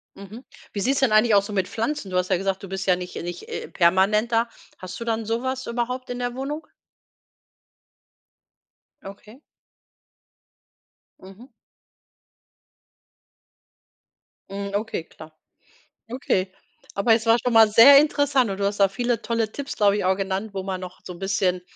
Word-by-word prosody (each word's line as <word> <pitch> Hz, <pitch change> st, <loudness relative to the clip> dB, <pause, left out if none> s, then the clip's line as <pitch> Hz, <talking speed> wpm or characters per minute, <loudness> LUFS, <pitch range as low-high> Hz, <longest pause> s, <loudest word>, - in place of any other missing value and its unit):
Mhm, 205 Hz, +5 st, -11 dB, 0.3 s
wie 200 Hz, -, -3 dB
sieht 265 Hz, +6 st, +1 dB
es -, -, 0 dB
denn 265 Hz, -5 st, +2 dB
eigentlich 215 Hz, 0 st, +4 dB
aus 200 Hz, 0 st, +3 dB
so 210 Hz, -, -7 dB
mit 190 Hz, -2 st, 0 dB
Pflanzen? 230 Hz, -2 st, -3 dB
Du 180 Hz, -, 0 dB
hast 180 Hz, 0 st, 0 dB
ja 185 Hz, -, +2 dB
gesagt, 195 Hz, 0 st, -2 dB
du -, -, -7 dB
bist 190 Hz, 0 st, -4 dB
ja 180 Hz, -2 st, +3 dB
nicht 180 Hz, 0 st, -8 dB
nicht, 175 Hz, 0 st, -7 dB
äh, -, -, -6 dB
permanent 195 Hz, +6 st, +2 dB
da. 230 Hz, +1 st, +1 dB, 0.3 s
Hast 185 Hz, +2 st, -9 dB
du 230 Hz, -, -6 dB
dann 225 Hz, -1 st, -2 dB
sowas 260 Hz, +4 st, -3 dB
überhaupt 250 Hz, +2 st, -3 dB
in 245 Hz, 0 st, -5 dB
der 245 Hz, 0 st, -3 dB
Wohnung? 290 Hz, +4 st, -5 dB, 2.4 s
Okay. 210 Hz, +5 st, -12 dB, 1.8 s
Mhm. 195 Hz, +8 st, -15 dB, 3.0 s
Mhm, 200 Hz, 0 st, -5 dB
okay, 215 Hz, -4 st, -3 dB
klar. 155 Hz, -1 st, -15 dB, 0.7 s
Okay, 195 Hz, -7 st, -1 dB, 0.4 s
aber 210 Hz, +3 st, +3 dB
es 225 Hz, 0 st, -2 dB
war 230 Hz, +1 st, +5 dB
schon 245 Hz, -, 0 dB
mal 225 Hz, -1 st, +7 dB
sehr 240 Hz, +7 st, +8 dB
interessant 285 Hz, -5 st, +1 dB
und 195 Hz, -, -4 dB
du 200 Hz, -, -1 dB
hast 200 Hz, +1 st, -2 dB
da 195 Hz, -, +6 dB
viele 240 Hz, +4 st, -2 dB
tolle 230 Hz, -2 st, -1 dB
Tipps, 280 Hz, +4 st, -6 dB
glaube 205 Hz, -1 st, +3 dB
ich, -, -, -2 dB
auch 190 Hz, +1 st, +2 dB
genannt, 195 Hz, +2 st, -3 dB
wo 190 Hz, -, -3 dB
man 185 Hz, -1 st, -4 dB
noch 180 Hz, 0 st, -9 dB
so 180 Hz, -, -7 dB
'n 170 Hz, -, -12 dB
bisschen 190 Hz, -2 st, -1 dB
210 Hz, 165 wpm, -23 LUFS, 190-240 Hz, 3.0 s, sehr